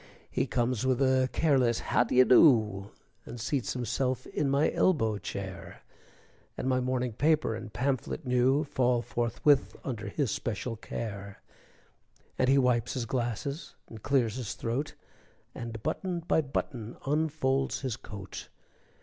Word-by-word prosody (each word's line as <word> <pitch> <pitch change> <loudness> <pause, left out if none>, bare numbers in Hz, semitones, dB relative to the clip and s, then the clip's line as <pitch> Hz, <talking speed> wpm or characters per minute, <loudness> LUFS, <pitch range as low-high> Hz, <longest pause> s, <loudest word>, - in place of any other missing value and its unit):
He - - 0
comes 120 -1 0
with 130 -1 +1
a 130 -1 +3
careless 130 -7 +2 0.2
"How - - +5
d'ye 125 +2 +5
do?" 110 - +5 0.3
And 120 - -9
seats 130 +2 -1
himself 130 +1 -1
in 145 -2 -1
my 140 +3 +3
elbow 115 - +2
chair; 95 -3 -7 0.7
And - - -3
my 130 -1 +2
morning 125 -1 -1
paper 155 0 +2
and 115 0 -7
pamphlet 135 +1 -2
new 125 +3 +3
Fall 125 -4 +1
forthwith 120 +5 +1
under 115 -5 -4
his 140 -8 -1
special 115 +1 -3
care, 100 -3 -6 1.0
And 130 - +3
he 135 - +5
wipes 125 -3 +2
his 125 -3 -2
glasses 125 - -3
and 110 -2 -11
clears 125 -4 +1
his 125 -5 -4
throat, 130 +6 -3 0.6
And, 115 -2 -7
button 180 -3 -2
by 160 -1 +2
button, 125 -4 -4
unfolds 140 -2 0
his 130 -4 -2
coat. 100 -5 -9
125 Hz, 140 wpm, -29 LUFS, 115-135 Hz, 1.0 s, How